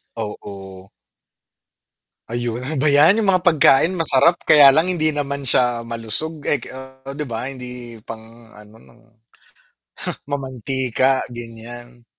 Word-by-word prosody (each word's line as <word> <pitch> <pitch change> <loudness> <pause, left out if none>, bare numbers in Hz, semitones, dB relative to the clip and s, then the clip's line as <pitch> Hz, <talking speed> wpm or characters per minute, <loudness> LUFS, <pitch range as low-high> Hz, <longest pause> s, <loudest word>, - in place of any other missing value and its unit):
Oo. 95 -3 -9 1.4
Ayun 120 0 -4 0.2
ba 135 - 0
yan, 150 +8 +5
yung 215 -3 0
mga 185 - +1
pagkain 165 0 +3
masarap 165 +1 +5
kaya 145 -3 +7
lang 160 +5 +3
hindi 155 -3 +1
naman 140 -2 -3
siya 120 -2 +3
malusog 115 +7 -5
eh, 145 - 0
ke - - -10 0.5
'di 150 - -4
ba? 120 +1 -5
Hindi 125 -3 -8
pang 115 0 -12
ano, 105 +1 -16 1.5
mamantika, 130 -1 -1
ganyan. 120 +1 -11
125 Hz, 115 wpm, -19 LUFS, 115-145 Hz, 1.5 s, kaya